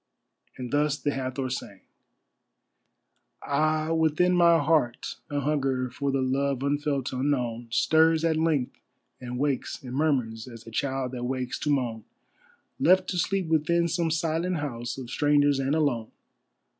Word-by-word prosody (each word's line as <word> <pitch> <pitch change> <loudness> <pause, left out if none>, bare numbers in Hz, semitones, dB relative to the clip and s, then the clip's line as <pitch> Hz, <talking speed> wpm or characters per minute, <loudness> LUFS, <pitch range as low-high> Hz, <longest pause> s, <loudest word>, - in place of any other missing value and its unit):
And 125 -2 -6
thus 145 0 +1
the 145 +1 -1
Hathor 130 -1 -3
sang: 100 -6 -6 1.6
Ah, 155 +2 +1
within 160 +3 +2
my 170 -1 +5
heart 145 -6 0
a 145 0 -1
hunger 135 -3 0
for 140 +2 -2
the 135 -1 +1
love 135 0 0
unfelt, 140 -2 -1
unknown, 125 -3 -1
Stirs 160 +6 +3
at 160 -1 +2
length, 155 -5 0 0.4
and 125 -1 -6
wakes 140 0 -1
and 125 -1 -7
murmurs 130 -6 0
as 115 -2 -11
a 115 - -10
child 130 +1 -2
that 125 -1 -4
wakes 130 0 -3
to 150 - -2
moan, 120 -6 0 0.8
Left 185 +1 +4
to 180 - -1
sleep 195 +2 0
within 165 +2 +2
some 170 0 0
silent 165 +2 0
house 120 -5 -4
of 130 -2 -7
strangers 145 0 +3
and 135 +2 0
alone. 130 -8 0
140 Hz, 145 wpm, -27 LUFS, 130-160 Hz, 1.6 s, my